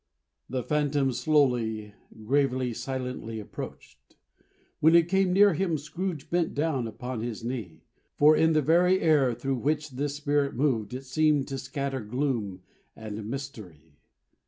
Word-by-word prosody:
The 130 0 -2
Phantom 145 -2 +1
slowly, 120 -6 +1 0.3
gravely, 130 -1 +1
silently, 125 -3 -5
approached. 65 -10 -10 0.6
When 160 +2 +5
it 170 -1 +5
came 190 0 +2
near 200 +1 +6
him, 165 -1 0
Scrooge 160 +1 -5
bent 170 -1 0
down 140 -5 0
upon 125 +1 -5
his 115 -1 -5
knee; 110 -10 -5 0.3
for 150 +1 +6
in 160 +1 +3
the 155 -1 +3
very 180 +5 +4
air 145 -7 +3
through 135 +3 -2
which 150 +3 -1
this 140 +2 -3
Spirit 145 -1 0
moved 120 -5 0
it 135 +1 -7
seemed 150 +1 +2
to 135 -1 -4
scatter 135 +1 -3
gloom 110 -5 -2 0.3
and 110 -1 -7
mystery. 95 - -8
135 Hz, 140 wpm, -27 LUFS, 115-150 Hz, 0.6 s, near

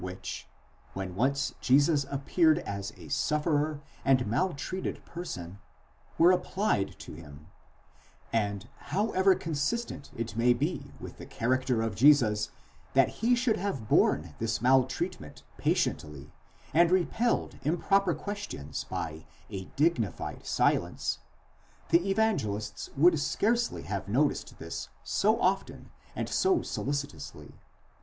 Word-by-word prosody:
which, 90 0 -6 0.5
when 95 -2 -4
once 140 +8 0
Jesus 140 +2 +4
appeared 155 +3 +3
as 100 - -4
a 85 -3 -11
sufferer 150 - 0 0.2
and 130 -2 +3
maltreated 180 - -2
person, 100 - -7 0.6
were 170 +2 +7
applied 180 - 0
to - - -10
him; 75 -2 -12 0.9
and 100 -1 -1 0.2
however 195 -2 +3
consistent 165 +3 -2
it 115 -2 -4
may 120 +2 +4
be 145 +9 -3
with - - -9
the - - -8
character 125 -1 0
of 115 -2 -1
Jesus 110 -4 +4 0.5
that - - +5
he 240 +2 +4
should 240 -3 +1
have 140 - -3
borne 75 -4 +3
this 115 0 -1
maltreatment 130 +2 +1 0.2
patiently, 75 -2 -1 0.4
and 170 +1 +5
repelled 190 +6 +1
improper 175 +4 +2
questions 200 - -5
by 80 0 -5 0.2
a 95 -2 -5
dignified 140 - 0
silence: - - +1 0.7
the 170 +3 +3
Evangelists 145 - 0
would 165 +1 +5
scarcely 230 - 0
have - - -4
noticed - - 0
this - - -6
so - - +2
often - - -1 0.2
and - - -2
so 375 -2 +2
solicitously 145 +1 -4
140 Hz, 115 wpm, -29 LUFS, 105-180 Hz, 0.9 s, were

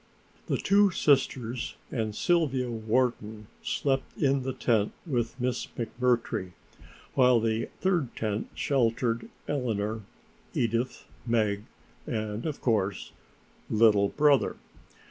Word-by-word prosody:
The - - +1
two 200 0 +4
sisters 130 -7 +1 0.2
and 110 -4 -2
Sylvia 135 -8 +1
Wharton 110 -1 -1 0.2
slept 135 -1 -1
in 135 -2 +2
the 130 +1 -2
tent 110 -5 +1
with 120 -6 -2
Miss 125 0 -1
McMurtry, 115 -6 0 0.6
while 125 -3 +5
the 115 0 -1
third 175 -9 +1
tent 105 -1 -2
sheltered 120 -3 0 0.2
Eleanor, 110 -6 -1 0.5
Edith, 115 +2 -1 0.2
Meg 105 -3 +1 0.4
and, 110 +3 -3
of 150 - -4
course, 105 -5 0 0.6
"little 105 -2 +4
brother". 145 -2 +3
120 Hz, 105 wpm, -28 LUFS, 110-135 Hz, 0.6 s, while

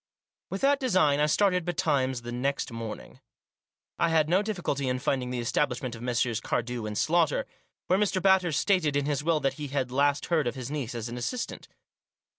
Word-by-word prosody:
With 195 - -4
that 280 0 +3
design 185 - +3
I 150 - +3
started 180 +2 +2
betimes 140 -7 0
the 120 - -6
next 135 +2 -2
morning. 115 - -7 0.8
I 170 - +3
had 160 -2 +2
no 185 +3 +4
difficulty 175 -10 -2
in 125 - 0
finding 125 -1 -1
the 125 -1 -3
estab 130 +5 +1
lishment 125 -1 -5
of 115 - -9
Messrs. 120 -2 0
Cardew 120 -2 -2
and 105 -1 -4
Slaughter, 335 - +2 0.4
where 185 - +2
Mr. 195 -2 +1
Batters 185 -5 +3
stated 175 -7 +2
in 145 -1 +1
his 145 -1 -1
will 165 -1 +2
that 135 - +1
he 145 - -3
had 135 -2 -2
last 140 +2 +2
heard 160 -6 +1
of 120 - -2
his 130 0 -6
niece 135 -5 -3
as 115 0 -4
an 120 +1 -6
assistant. 225 - -4
145 Hz, 200 wpm, -28 LUFS, 125-175 Hz, 0.8 s, no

